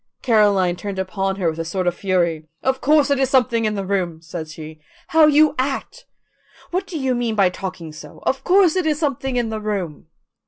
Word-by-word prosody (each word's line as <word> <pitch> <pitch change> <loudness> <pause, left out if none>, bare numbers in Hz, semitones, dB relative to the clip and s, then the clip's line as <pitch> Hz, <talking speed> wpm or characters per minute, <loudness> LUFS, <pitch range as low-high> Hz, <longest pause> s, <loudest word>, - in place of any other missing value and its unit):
Caroline 205 -6 +3
turned 200 +1 -6
upon 195 +1 -2
her 190 -3 -1
with 160 - -9
a - - -1
sort 180 +3 -3
of 175 - +1
fury. 170 -4 -1 0.2
"Of 265 0 0
course 295 0 +3
it 280 - +2
is 265 -2 +2
something 235 -4 +2
in 215 0 0
the 195 -1 -3
room," 185 -4 -1
said 165 0 -7
she. 155 0 -10 0.3
"How 320 -1 +6
you 305 0 +5
act! 280 - -3 0.6
What 375 +2 -2
do 345 - -5
you 265 -3 0
mean 240 -2 -1
by 195 -3 +3
talking 180 -4 -7
so? 155 - -11
Of 270 - -1
course 370 -2 +4
it 365 -4 0
is 305 -2 +1
something 270 -4 -2
in 240 -2 0
the 220 -1 -3
room." 190 -9 -4
210 Hz, 210 wpm, -21 LUFS, 180-270 Hz, 0.6 s, How